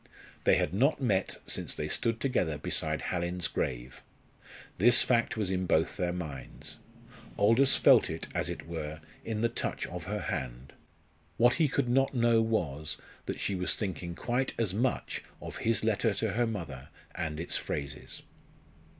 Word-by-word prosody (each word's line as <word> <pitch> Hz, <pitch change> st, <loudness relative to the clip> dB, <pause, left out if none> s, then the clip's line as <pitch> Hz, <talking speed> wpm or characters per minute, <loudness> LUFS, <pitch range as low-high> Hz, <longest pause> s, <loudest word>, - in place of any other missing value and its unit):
They -, -, +6 dB
had -, -, 0 dB
not 135 Hz, +11 st, +3 dB
met 100 Hz, -8 st, +1 dB
since -, -, -2 dB
they -, -, -3 dB
stood 115 Hz, -1 st, 0 dB
together 105 Hz, -, 0 dB
beside -, -, -1 dB
Hallin's 90 Hz, 0 st, -1 dB
grave. -, -, -3 dB, 0.8 s
This 120 Hz, +5 st, +7 dB
fact 120 Hz, -2 st, +1 dB
was 100 Hz, -4 st, 0 dB
in 95 Hz, -1 st, -1 dB
both 80 Hz, -1 st, +2 dB
their 90 Hz, -3 st, 0 dB
minds. 80 Hz, -7 st, -7 dB, 0.6 s
Aldous 115 Hz, +7 st, +5 dB
felt -, -, +6 dB
it, -, -, -5 dB
as -, -, -1 dB
it -, -, -6 dB
were, 80 Hz, -2 st, -5 dB, 0.2 s
in 110 Hz, -1 st, -3 dB
the 115 Hz, -, +4 dB
touch 115 Hz, -, -3 dB
of 90 Hz, -1 st, -7 dB
her 105 Hz, +2 st, -3 dB
hand. 65 Hz, -3 st, -4 dB, 0.6 s
What 120 Hz, +1 st, +5 dB
he 155 Hz, -, +5 dB
could 140 Hz, -2 st, 0 dB
not 135 Hz, +2 st, +2 dB
know 115 Hz, -1 st, +4 dB
was, 80 Hz, -10 st, -1 dB, 0.3 s
that -, -, -3 dB
she -, -, -1 dB
was 90 Hz, -1 st, 0 dB
thinking 90 Hz, -4 st, -4 dB
quite 125 Hz, +6 st, -1 dB
as 110 Hz, -6 st, 0 dB
much 120 Hz, +5 st, -1 dB, 0.2 s
of -, -, -7 dB
his 115 Hz, -1 st, 0 dB
letter 110 Hz, -1 st, +2 dB
to 110 Hz, -2 st, 0 dB
her 120 Hz, +3 st, +1 dB
mother 80 Hz, -12 st, -5 dB, 0.2 s
and 75 Hz, -1 st, -3 dB
its 85 Hz, -, -3 dB
phrases. 70 Hz, 0 st, -5 dB
100 Hz, 165 wpm, -30 LUFS, 80-115 Hz, 0.8 s, This